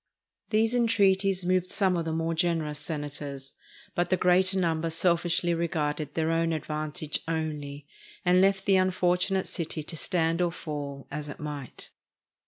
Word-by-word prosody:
These 225 +2 +2
entreaties 195 -5 +3
moved 185 0 +2
some 190 -1 +2
of 170 -1 -1
the 160 - -2
more 165 +1 -1
generous 160 -3 0
Senators. 145 -3 -5 0.4
But 175 - 0
the 185 - +3
greater 185 +2 +3
number 165 -2 0
selfishly 170 +1 +1
regarded 155 -3 -2
their 160 0 +1
own 165 0 +1
advantage 155 0 -2
only, 150 -3 -3 0.4
and 180 +1 +5
left 195 0 +2
the 195 -2 +5
unfortunate 185 0 +1
city 160 -2 -3
to 165 - -5
stand 165 +1 +1
or 175 -1 +2
fall, 145 -4 -6
as 150 +1 -5
it - - -8
might. 145 -4 -7
165 Hz, 150 wpm, -28 LUFS, 150-185 Hz, 0.4 s, and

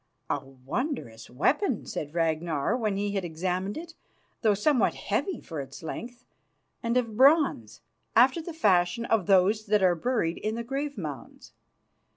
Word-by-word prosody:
"A 145 - -1
wondrous 135 - -5
weapon," 255 - +1
said 150 +2 -5
Ragnar 160 0 0
when 215 -5 -1
he 205 0 -1
had 195 -2 -1
examined 180 +4 -2
it, 335 +1 -8 0.5
"though 215 -3 +3
somewhat 255 +5 +2
heavy 385 -3 -2
for 160 -4 -5
its 135 +3 -10
length, 240 +9 -7 0.6
and 235 0 0
of 230 -4 -1
bronze, 270 - +3 0.3
after 260 +8 +5
the 345 - -7
fashion 210 - +2
of 225 -5 +1
those 205 +3 +3
that 210 -1 +3
are 180 -1 +5
buried 175 -2 -1
in 215 +1 -2
the 235 - -3
grave 275 +2 -3
mounds. 150 -7 -8
205 Hz, 155 wpm, -27 LUFS, 165-250 Hz, 0.6 s, after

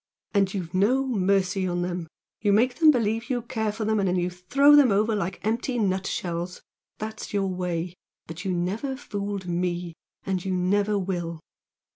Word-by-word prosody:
And 195 -2 +3
you've 180 -3 -5
no 235 +9 +3
mercy 195 -4 +1
on 175 0 -1
them, 175 -2 -3 0.3
you 205 -1 +3
make 240 +7 +3
them 320 -2 +7
believe 230 -4 +1
you 245 -3 -1
care 220 -3 -1
for 215 +1 -4
them 220 0 +2
and 195 - +1
then 180 - +1
you 180 0 0
throw 275 +12 +5
them 280 -6 +6
over 215 +3 +2
like 190 -3 -3
empty 235 +3 0
nutshells! 185 -3 -2 0.4
That's 220 0 -6
your 200 -1 +2
way! 180 -2 -2 0.3
But 165 +1 -8
you 190 - -1
never 200 +10 -2
fooled 205 -6 -4
ME, 175 -1 -2 0.3
and 190 -2 -1
you 190 - -1
never 200 +3 +2
will!" 175 -4 -3
195 Hz, 175 wpm, -26 LUFS, 180-220 Hz, 0.4 s, them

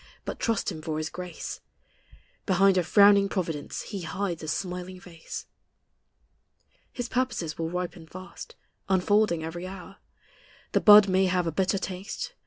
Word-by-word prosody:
But - - -5
trust 230 -3 0
Him 155 - -7
for 155 -1 -3
His 155 0 -3
grace: 180 -2 -7 0.9
Behind 195 0 +4
a 180 - +3
frowning 200 +2 +5
providence 165 -7 -3
He 200 -3 -6
hides 175 +1 -3
a 155 - -7
smiling 180 +2 -4
face. 170 -2 -9 1.5
His 245 -1 -4
purposes 245 -12 -2
will 165 0 -1
ripen 175 -1 -5
fast, 185 +3 -10 0.3
Unfolding 190 -2 +2
every 175 +3 -5
hour; 195 +1 -10 0.7
The - - +2
bud 210 -1 +9
may 190 0 +3
have 180 -1 +1
a 165 - -1
bitter 190 +4 +1
taste. 195 - -5
185 Hz, 145 wpm, -27 LUFS, 170-195 Hz, 1.5 s, bud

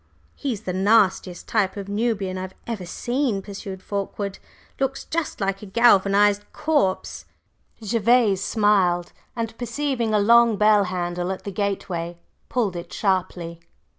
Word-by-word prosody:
"He's 250 -8 -4
the 180 - -3
nastiest 190 -2 +2
type 205 -3 0
of 200 -1 -5
Nubian 205 -3 -1
I 185 - -4
have 185 0 -7
ever 210 -7 -5
seen," 240 -2 -1
pursued 195 -1 -8
Fulkeward. 200 0 -4 0.4
"Looks 270 0 -1
just 330 -2 -3
like 195 -1 -1
a 210 - -9
galvanized 205 -1 +4
corpse." 295 -11 0 0.6
Gervase 225 -2 +3
smiled, 195 -5 +2 0.2
and 225 -1 -3
perceiving 245 -1 -1
a 215 - +3
long 235 +1 +5
bell 210 -1 +5
handle 175 0 -2
at 190 - -6
the 200 - -5
gateway, 180 -4 -3 0.3
pulled 220 -7 0
it 170 - -7
sharply. 180 -4 -1
200 Hz, 135 wpm, -23 LUFS, 190-230 Hz, 0.6 s, long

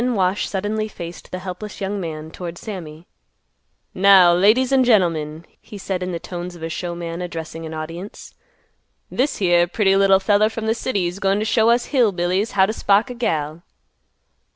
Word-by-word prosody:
Then 250 -1 0
Wash 190 0 0
suddenly 210 +2 -2
faced 170 -4 -9
the 185 - -5
helpless 185 +3 -7
young 200 0 -3
man 160 -2 -6
toward 175 -1 -7
Sammy. 170 -6 -8 0.9
"Now 190 -2 +6
ladies 215 +9 +3
and 265 -1 +4
gentlemen," 165 -8 +1 0.2
he 210 - -11
said 190 -2 -3
in 180 0 -3
the 170 - -3
tones 175 +1 -7
of 165 - -11
a 165 - -3
showman 170 0 -5
addressing 165 -2 -6
an 160 - -8
audience, 165 +6 -8 0.8
"this 270 +4 0
here 175 -3 +3
pretty 195 +1 +2
little 195 -1 +5
feller 205 +2 +3
from 220 0 -5
th' 225 - +1
city's 195 -7 -2
goin' 195 0 +1
t' 215 - -1
show 225 0 +3
us 240 +1 +3
Hill 240 -6 +4
Billies 185 +5 -1
how 190 -1 +4
t' 215 - -2
spark 210 +3 +2
a - - -4
gal." 160 -9 -2
190 Hz, 180 wpm, -21 LUFS, 175-215 Hz, 0.9 s, Now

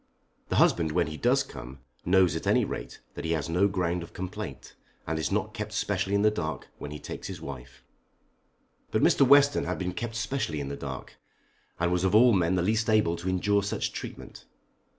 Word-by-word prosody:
The - - 0
husband 80 -2 +3
when 85 0 +2
he 80 - -6
does 125 - +2
come 65 0 -10 0.3
knows 90 -3 +4
at 80 - -4
any - - +4
rate - - -6
that - - -7
he 80 0 0
has 80 -3 -2
no 90 +4 +3
ground 90 -3 -1
of 85 - -10
complaint, 95 0 -6 0.3
and 80 0 -2
is 80 - -1
not 105 +1 -1
kept 105 -2 -5
specially 100 -1 0
in 100 - +2
the 105 - +5
dark 80 -8 -4
when - - -6
he 75 - -6
takes - - -7
his - - -7
wife. 65 -3 -9 1.1
But - - +1
Mr. - - +4
Western 145 +1 +5
had - - -2
been 90 -1 -3
kept 120 -1 -4
specially 110 - -2
in 70 -1 -4
the 70 - -4
dark, 70 -2 -7 0.6
and 85 +1 +1
was 90 0 +1
of 95 +2 +2
all 120 +2 +7
men 90 -1 +2
the 90 - +1
least 110 +3 +1
able 105 -6 +3
to 90 +2 -3
endure 100 +3 +2
such 100 - -2
treatment. - - -8
90 Hz, 210 wpm, -28 LUFS, 80-105 Hz, 1.1 s, all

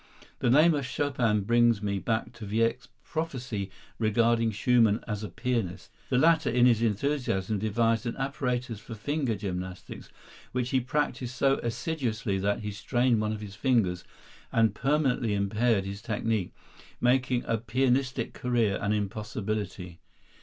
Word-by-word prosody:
The - - +1
name 155 +7 +6
of 145 -2 -1
Chopin 130 -6 0
brings 120 0 +3
me 100 -1 -1
back 115 +3 -2
to 115 -3 -9
Wieck's 115 +3 0 0.2
prophecy 130 - -4 0.3
regarding 115 +1 +3
Schumann 110 0 +3
as 105 -2 -3
a 105 - -4
pianist. 115 -7 -3 0.2
The 125 - +2
latter 160 +4 +4
in 120 +1 +4
his 115 -3 +4
enthusiasm 110 -3 0
devised 115 +2 +1
an 115 - -4
apparatus 125 -4 -2
for 115 - -9
finger 135 +1 -1
gymnastics 95 -2 -6 0.4
which 125 0 -1
he 130 - +3
practised 130 -1 -2
so 135 0 +2
assiduously 115 -5 -2
that 100 +3 0
he 105 0 -4
strained 120 +3 +1
one 105 0 0
of 110 -1 -4
his 100 -2 -8
fingers 105 -7 +1 0.5
and 115 -1 +3
permanently 135 -6 +1
impaired 100 +1 +1
his 100 +1 -6
technique, 110 -4 -1 0.5
making 125 0 +2
a 115 - 0
pianistic 125 +2 0
career 115 -5 0
an 105 +1 +1
impossibility. 105 -3 -3
115 Hz, 145 wpm, -28 LUFS, 105-125 Hz, 0.5 s, name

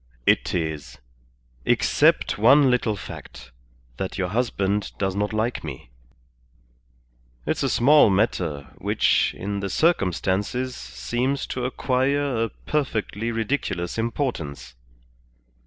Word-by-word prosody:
"It - - +2
is. 80 -3 -3 0.7
Except - - +2
one 135 +4 +6
little 120 -3 +1
fact, 65 -9 -10 0.5
that 95 - -4
your 90 -2 -1
husband 105 -3 -1
does 95 -1 -1
not 105 +1 -1
like 110 +3 -1
me. 65 -6 -8 1.5
It's - - -1
a - - +1
small 145 0 +6
matter, 75 -7 0
which, - - +2
in 100 +1 -3
the 100 0 -3
circumstances, 105 - 0
seems 120 - -2
to 125 -1 -3
acquire 130 -1 0
a - - -5
perfectly 115 -6 -2
ridiculous 110 -5 -2
importance. 80 - -3
105 Hz, 105 wpm, -24 LUFS, 90-125 Hz, 1.5 s, one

